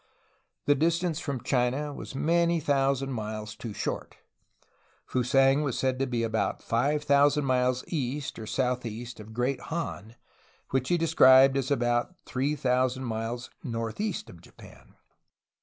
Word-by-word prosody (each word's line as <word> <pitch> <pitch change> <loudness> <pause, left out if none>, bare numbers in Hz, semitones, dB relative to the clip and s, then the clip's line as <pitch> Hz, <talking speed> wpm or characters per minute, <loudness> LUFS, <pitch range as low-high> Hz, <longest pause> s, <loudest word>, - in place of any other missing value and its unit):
The 145 - +5
distance 165 +2 0
from 140 -6 -4
China 135 +3 0
was 140 - -8
many 170 +3 +2
thousand 135 -2 +1
miles 110 -2 -5
too 115 - -7
short; - - -4 0.9
Fusang 135 +3 +3
was 140 -5 -1
said 130 -1 0
to 135 - 0
be 120 -2 -1
about 110 -1 -1
five 140 +6 +1
thousand 145 0 +4
miles 125 -1 +1
east, 140 -4 -3
or 110 - -7
southeast, 120 -1 -2
of 110 +1 -10
Great 125 +4 -1
Han, 120 -9 -4 0.6
which 130 -1 0
he 175 - +3
described 135 -5 +6
as 135 -2 -1
about 120 +4 0
three 140 +3 -1
thousand 130 -1 +1
miles 115 +1 -4
northeast 115 - -3
of 85 - -13
Japan. - - -17
130 Hz, 140 wpm, -28 LUFS, 120-145 Hz, 0.9 s, described